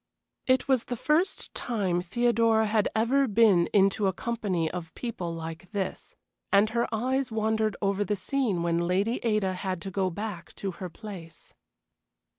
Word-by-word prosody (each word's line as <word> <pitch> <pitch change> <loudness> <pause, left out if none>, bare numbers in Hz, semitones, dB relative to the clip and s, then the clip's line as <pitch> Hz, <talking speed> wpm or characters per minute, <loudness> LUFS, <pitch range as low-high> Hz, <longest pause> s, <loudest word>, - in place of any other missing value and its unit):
It 260 +1 +3
was 260 -3 +2
the 245 - -3
first 310 - 0
time 195 -7 -1
Theodora 230 +3 +2
had 215 -1 +2
ever 260 +5 +3
been 205 -6 +4
into 195 0 +3
a 190 - +1
company 195 -6 -1
of 170 -2 -6
people 200 -8 -4
like 165 +2 -7
this, 195 -2 -4 0.4
and 205 +2 +4
her 235 +1 +1
eyes 255 +3 0
wandered 220 -1 0
over 200 +1 +1
the 205 +1 -1
scene 205 -3 -1
when 170 0 +1
Lady 200 +7 +1
Ada 210 -5 +1
had 185 -1 -3
to 195 - -5
go 190 0 0
back 180 -1 -6
to 195 - -3
her 180 +1 -7
place. 180 -3 -11
205 Hz, 160 wpm, -28 LUFS, 185-230 Hz, 0.4 s, been